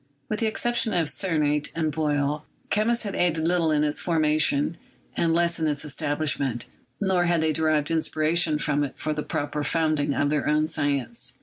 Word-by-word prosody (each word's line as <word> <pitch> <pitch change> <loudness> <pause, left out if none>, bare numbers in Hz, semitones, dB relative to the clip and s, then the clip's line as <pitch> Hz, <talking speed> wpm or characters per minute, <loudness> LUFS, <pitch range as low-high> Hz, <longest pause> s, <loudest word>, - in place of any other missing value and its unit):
With 215 - -2
the 225 - +1
exception 230 -1 +1
of 165 -3 +1
Sennert 150 -5 0
and 160 -2 0
Boyle, 150 -1 -1 0.3
chemists 235 +3 +2
had 200 -2 -4
aided 165 -2 +1
little 170 -2 +2
in 150 -1 +2
its 150 -1 0
form 165 -3 +1
ulation 150 0 +2 0.4
and 165 - +1
less 170 +1 +1
in 160 - +1
its 145 -1 -2
establishment, 140 -4 -1 0.3
nor 190 -3 +2
had 170 -1 +2
they 160 -1 +1
derived 155 -1 +1
inspiration 160 0 +1
from 145 -1 0
it 140 - -5
for 155 - -2
the 150 - -3
proper 150 0 -3
founding 155 -3 +1
of 145 0 +1
their 150 -1 0
own 150 +1 +2
science. 145 - -2
155 Hz, 185 wpm, -25 LUFS, 145-170 Hz, 0.4 s, chemists